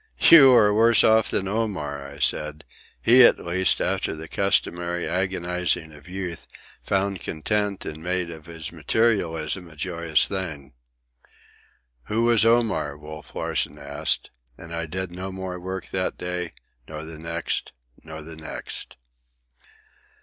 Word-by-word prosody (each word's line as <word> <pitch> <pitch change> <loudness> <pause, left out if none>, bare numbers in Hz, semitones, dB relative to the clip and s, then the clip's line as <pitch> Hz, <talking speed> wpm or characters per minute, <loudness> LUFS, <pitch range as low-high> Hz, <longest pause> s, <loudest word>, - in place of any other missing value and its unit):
"You 140 -5 +10
are 105 -3 +5
worse 115 +2 +5
off 110 0 +4
than 95 - -1
Omar," 75 -10 -3
I 70 - -11
said. 75 0 -1 0.4
"He, 125 +3 +7
at - - +7
least, 90 +1 +1
after - - -1
the 80 +1 -8
customary 85 -2 0
agonizing 90 -3 -1
of 75 +4 -15
youth, 90 -2 -5 0.3
found 100 -1 -1
content 100 +5 -2
and 80 0 -6
made 90 0 -1
of 80 -1 -11
his 80 -2 -7
materialism 85 -1 0
a 80 - -15
joyous 85 -1 0
thing." 80 -9 -5 1.3
"Who 110 +2 0
was 115 -2 +5
Omar?" 115 -11 +2
Wolf 75 +1 -11
Larsen 75 - -2
asked, 70 0 -1 0.3
and 85 - -10
I 85 0 -3
did 90 +2 -4
no 90 +2 -6
more 95 -1 -5
work 95 +1 -5
that 95 -1 -2
day, 90 -1 -4 0.3
nor 80 0 -7
the 80 -1 -9
next, 85 +1 -3 0.3
nor 80 -1 -9
the 80 +1 -10
next. 80 0 -5
90 Hz, 140 wpm, -24 LUFS, 80-95 Hz, 1.3 s, You